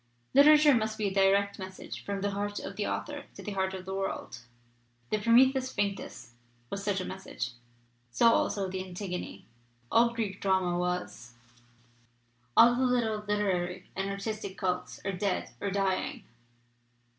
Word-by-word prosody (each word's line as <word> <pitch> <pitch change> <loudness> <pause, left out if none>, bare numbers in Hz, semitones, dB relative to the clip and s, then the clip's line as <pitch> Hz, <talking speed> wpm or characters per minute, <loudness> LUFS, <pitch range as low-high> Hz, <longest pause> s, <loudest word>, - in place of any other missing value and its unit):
Literature 300 +1 +7
must 220 -2 0
be 210 -2 0
a - - -6
direct 200 +1 +3
message 190 0 -8
from 200 -1 -3
the 200 0 0
heart 205 +1 -3
of - - -5
the 210 - -2
author 290 -1 -4
to - - -10
the 210 - -4
heart 190 -1 -1
of 185 -1 -8
the 190 - -5
worldJ 195 -10 -4 0.7
The 215 - +2
Prometheus 260 +4 +4
Vinctus 200 - -3 0.4
was 200 - -4
such 200 -1 0
a - - -4
message, 190 -9 -5 0.7
DO - - +5
also 205 -4 +3
the 185 0 -4
Antigone. 180 0 -6 0.5
All 235 +1 +5
Greek 215 -5 -3
drama 190 -2 +2
was. 180 -9 -3 1.2
"All 235 +1 +8
the 250 - 0
little 235 -4 +1
literary 195 -4 -1
and 195 +1 -2
artistic 200 0 -4
cults 180 -1 -2
are 195 - 0
dead 195 0 -2
or 200 - -1
dying. 195 -1 -1
200 Hz, 155 wpm, -30 LUFS, 190-220 Hz, 1.2 s, All